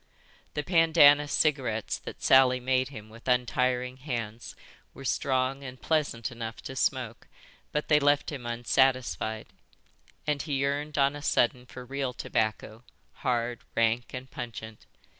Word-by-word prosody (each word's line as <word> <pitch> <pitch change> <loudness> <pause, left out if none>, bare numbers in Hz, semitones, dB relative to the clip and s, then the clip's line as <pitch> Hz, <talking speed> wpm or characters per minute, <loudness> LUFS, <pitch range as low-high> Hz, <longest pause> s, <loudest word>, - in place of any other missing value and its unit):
'" - - -31
"The 150 - -1
pandanus 150 -4 +5
cigarettes 130 -8 0
that - - -9
Sally 130 -1 +6
made 130 +1 +1
him 110 -6 -10
with 115 +3 -14
untiring 125 0 +1
hands 120 -5 -5 0.4
were 135 - -10
strong 130 +1 0
and 130 -1 -8
pleasant 140 -7 -1
enough 115 -1 -6
to 130 - -7
smoke, 125 -3 -1 0.4
but 150 - -2
they 150 -1 +5
left 145 +1 +2
him 130 -5 -6
unsatisfied; 120 -2 +1 0.8
and 150 -2 0
he 150 - -4
yearned 140 +2 -1
on 140 0 +3
a 145 - -7
sudden 125 -3 +1
for 125 0 -10
real 135 0 -3
tobacco, 110 0 -2 0.3
hard, 120 -1 -1 0.2
rank, 115 +1 +1
and 130 0 -8
pungent. 110 -2 -8
130 Hz, 140 wpm, -28 LUFS, 120-140 Hz, 0.8 s, Sally